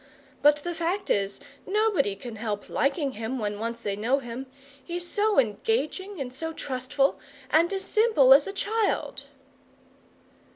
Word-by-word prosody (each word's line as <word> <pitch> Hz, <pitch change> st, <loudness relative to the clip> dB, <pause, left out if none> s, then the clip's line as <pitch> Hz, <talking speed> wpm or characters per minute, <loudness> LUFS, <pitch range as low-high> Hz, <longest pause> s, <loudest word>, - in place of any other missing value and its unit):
But 295 Hz, 0 st, +6 dB
the 350 Hz, -, -2 dB
fact 340 Hz, +4 st, -2 dB
is, 200 Hz, 0 st, 0 dB, 0.3 s
nobody 405 Hz, -, +2 dB
can 220 Hz, +2 st, -8 dB
help 210 Hz, -2 st, -4 dB
liking 275 Hz, +1 st, 0 dB
him 230 Hz, +2 st, -4 dB
when 205 Hz, -3 st, -3 dB
once 230 Hz, +1 st, -3 dB
they 205 Hz, -4 st, -3 dB
know 230 Hz, +7 st, +1 dB
him. 255 Hz, 0 st, -6 dB, 0.4 s
He's 350 Hz, 0 st, -4 dB
so 420 Hz, +3 st, +1 dB
engaging 375 Hz, -, 0 dB
and 255 Hz, -2 st, -4 dB
so 325 Hz, +5 st, -4 dB
trustful, 270 Hz, 0 st, -1 dB, 0.3 s
and 335 Hz, +3 st, +4 dB
as 390 Hz, -1 st, -2 dB
simple 425 Hz, -, +5 dB
as 280 Hz, +1 st, +5 dB
a -, -, -3 dB
child!" 425 Hz, +2 st, -1 dB
280 Hz, 150 wpm, -27 LUFS, 235-375 Hz, 0.4 s, But